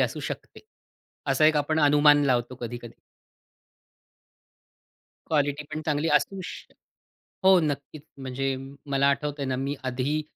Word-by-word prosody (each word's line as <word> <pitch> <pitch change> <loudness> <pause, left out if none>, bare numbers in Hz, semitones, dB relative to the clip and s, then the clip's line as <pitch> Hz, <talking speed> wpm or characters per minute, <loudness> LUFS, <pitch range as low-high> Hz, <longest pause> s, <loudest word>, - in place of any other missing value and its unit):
असू - - 0
शकते. - - -7 0.7
असा 155 - +4
एक 155 -1 +4
आपण 155 +2 +1
अनुमान 145 0 +5
लावतो 125 -1 +1
कधी-कधी. 120 0 -7 2.3
क्वालिटी 145 -1 0
पण 155 - -4
चांगली 150 +1 +1
असू 195 +4 -2
शक - - -9 0.7
हो, 190 -1 +7
नक्कीच. 145 -1 -3 0.2
म्हणजे 135 0 -2 0.4
मला 140 0 +3
आठवतंय 145 0 -1
ना, 130 -1 -1
मी 135 +2 -2
आधी 135 +4 -1
145 Hz, 120 wpm, -26 LUFS, 135-150 Hz, 2.3 s, हो